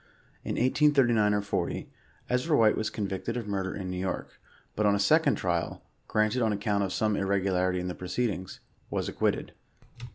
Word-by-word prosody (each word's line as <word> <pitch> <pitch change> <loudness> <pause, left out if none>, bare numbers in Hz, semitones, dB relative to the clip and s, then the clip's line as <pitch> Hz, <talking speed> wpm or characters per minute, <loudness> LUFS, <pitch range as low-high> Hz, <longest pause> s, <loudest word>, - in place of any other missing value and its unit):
In - - -3
1839 125 -5 +3
or 105 - +1
40, 105 - -2 0.4
Ezra 125 +5 +1
White 110 -2 +5
was 110 - -1
convicted 105 +3 -3
of 115 -3 -4
murder 95 -2 -2
in 95 -2 -4
New 90 - -3
York, 95 0 -4 0.3
but 105 0 +2
on 100 - +4
a - - 0
second 100 - +4
trial, - - -2 0.2
granted 110 +4 +1
on 110 -2 +2
account 100 0 0
of 95 - -2
some 105 +1 +1
irregularity 95 -2 +1
in 90 - -3
the 90 - -3
proceedings. 95 0 -3 0.3
Was - - -2
ac - - -7
quitted. - - 0
105 Hz, 175 wpm, -28 LUFS, 95-115 Hz, 0.4 s, White